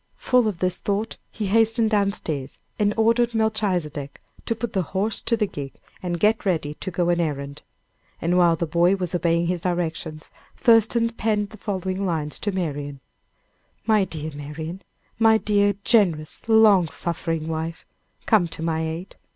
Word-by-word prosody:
Full 250 -3 +3
of 205 -5 -2
this 180 0 -1
thought, 205 +2 -2
he 215 - -4
hastened 225 +2 +3
down 200 -2 +3
stairs 145 -8 -4 0.2
and 205 -1 +3
ordered 230 +1 +3
Melchizedek 180 -10 -1 0.3
to 230 - 0
put 225 0 -4
the 190 - +1 0.2
horse 215 +3 0
to 230 0 0
the 215 - +2
gig 140 -8 -7 0.3
and 175 -2 -3
get 215 +3 +3
ready 160 -6 0
to 170 - -6
go 175 0 0
an 175 0 +2
errand. 140 -3 -3 0.6
And 170 +2 0
while 175 -2 +5
the 170 - -2
boy 170 +4 +3
was 180 -3 -4
obeying 170 -1 +1
his 175 0 -1
directions, 165 -3 -3 0.3
Thurston 230 0 +4
penned 210 -3 -1
the 215 - -11
following 190 -1 -3
lines 160 -5 -2
to 205 - -1
Marian: 145 -6 -3 0.9
"My 215 -2 +4
dear 155 -4 -5
Marian 155 +5 -7 0.4
my 225 -1 +6
dear, 205 -2 +2
generous, 175 -10 +2
long 215 -6 +6
suffering 165 -2 -3
wife 160 +1 -4 0.4
come 175 - +4
to 160 - -7
my 160 -1 0
aid. 160 +3 -5
180 Hz, 165 wpm, -23 LUFS, 160-215 Hz, 0.9 s, my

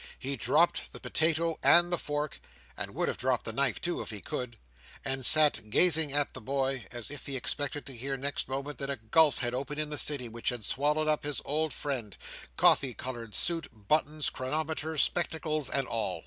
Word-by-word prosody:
He 140 +1 -3
dropped 170 +5 +1
the - - -8
potato 165 +1 +1
and 175 0 +6
the 175 - +2
fork—and 145 - -6
would - - -1
have - - -2
dropped 130 -1 0
the 115 - -3
knife 135 0 +1
too 175 0 -2
if - - -7
he 105 -2 -4
could—and 115 - -6
sat 145 -7 +5
gazing 160 +3 +5
at 145 -1 +1
the - - -7
boy, 135 -2 -2
as 120 +1 -5
if 145 -3 -7
he 140 - -1
expected 145 +3 -2
to 135 - -3
hear 135 +3 -2
next 140 0 -3
moment 140 +2 -5
that 140 -1 -3
a 140 - -1
gulf 135 +5 +3
had 120 -1 -2
opened 140 +3 -4
in 150 0 -3
the 150 - -3
City, 140 -5 +1
which 115 0 -1
had 120 -4 -4
swallowed 150 +5 0
up 155 -1 +1
his 145 -1 -1
old 155 +2 0
friend, 125 - -4 0.4
coffee 130 -4 +4
coloured 120 -5 -6
suit, 170 -1 +1 0.2
buttons, 155 0 +1
chronometer, 155 +3 -3
spectacles, 155 -2 0
and 135 -1 +1
all. 115 -2 -1
140 Hz, 190 wpm, -29 LUFS, 125-155 Hz, 0.4 s, and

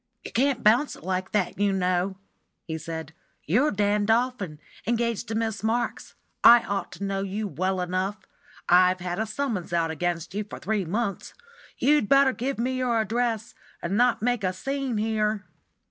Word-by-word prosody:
"You - - -6
can't 265 0 +1
bounce 240 +7 +4
it - - -15
like 185 +1 -2
that, 200 -2 -1
you 205 -1 +3
know," 185 0 0 0.5
he 160 -2 -4
said. 160 -1 -6 0.3
"You're 245 - +3
Dan 205 -1 +1
Dolphin, 225 -8 0 0.3
engaged 235 0 0
to 225 - -3
Miss 220 -2 -1
Marks; 230 +3 -2 0.3
I 235 0 +9
ought 200 0 -3
to - - -7
know 195 0 -1
you 200 +2 -3
well 185 +3 -1
enough; 185 +3 -1 0.5
I've 180 +1 +5
had 180 +1 -3
a 220 - -1
summons 215 -7 -3
out 165 -1 +1
against 170 0 -2
you 210 +2 -2
for 205 - -9
three 210 -3 -1
months. 200 +3 -3 0.4
You'd 290 -6 +3
better 275 -1 +5
give 265 +4 -3
me 255 +3 -1
your 240 -3 +1
address, 225 0 -1 0.3
and 175 +3 -2
not 245 0 +3
make 245 -3 +1
a 185 -1 +1
scene 270 +4 -2
here." 215 -1 0
210 Hz, 175 wpm, -26 LUFS, 185-235 Hz, 0.5 s, I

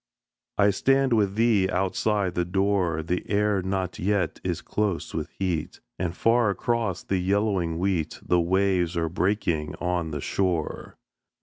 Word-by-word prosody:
I 100 0 +5
stand 135 +5 +2
with 100 -3 +2
thee 110 -4 +3
outside 95 +1 0
the 90 - 0
door, 90 -3 0
The 90 +3 -2
air 105 -1 +2
not 95 -1 -3
yet 95 -2 0
is - - -2
close 105 -5 -2
with - - -3
heat, 90 -5 -2 0.2
And 90 -1 -2
far 115 -1 +3
across 105 -1 -1
the 95 - -1
yellowing 95 -3 0
wheat 90 -3 -1
The 90 - +3
waves 90 -1 +1
are 80 -1 0
breaking 90 -4 -1
on 90 -2 -1
the 75 -1 -4
shore. 85 0 -2
95 Hz, 145 wpm, -26 LUFS, 85-100 Hz, 0.2 s, I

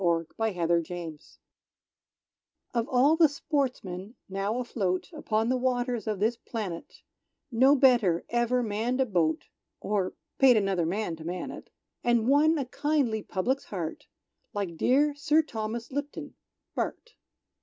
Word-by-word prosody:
Sir 170 -2 +2
Thomas 220 -4 -1
Lipton 170 -2 -1 1.5
Of 235 -1 0
all 265 +5 +4
the 325 -2 +6
sportsmen 250 - -3
now 195 +4 -2
afloat 210 - -2
Upon 225 -7 0
the 255 - +2
waters 245 -2 -1
of 210 -3 -1
this 225 +3 +1
planet, 210 -8 -6 0.5
No 260 +5 +5
better 240 -11 +4
ever 240 +1 +2
manned 225 +4 -1
a 265 - +4
boat, 170 -8 0 0.3
(Or 200 -3 -1 0.3
paid 260 -4 +7
another 195 -5 +1
man 185 -2 -2
to 160 - -10
man 175 +2 -4
it,) - - -10 0.3
And 240 -1 +2
won 305 +4 +4
a 275 - -1
kindly 265 -5 0
public's 250 +9 -1
heart 170 -5 -5 0.5
Like 195 -5 -2
dear 285 - +3
Sir 300 +2 +3
Thomas 230 -3 -5
Lipton, 285 +2 -5 0.4
Bart. 480 - -4
230 Hz, 135 wpm, -28 LUFS, 190-260 Hz, 1.5 s, paid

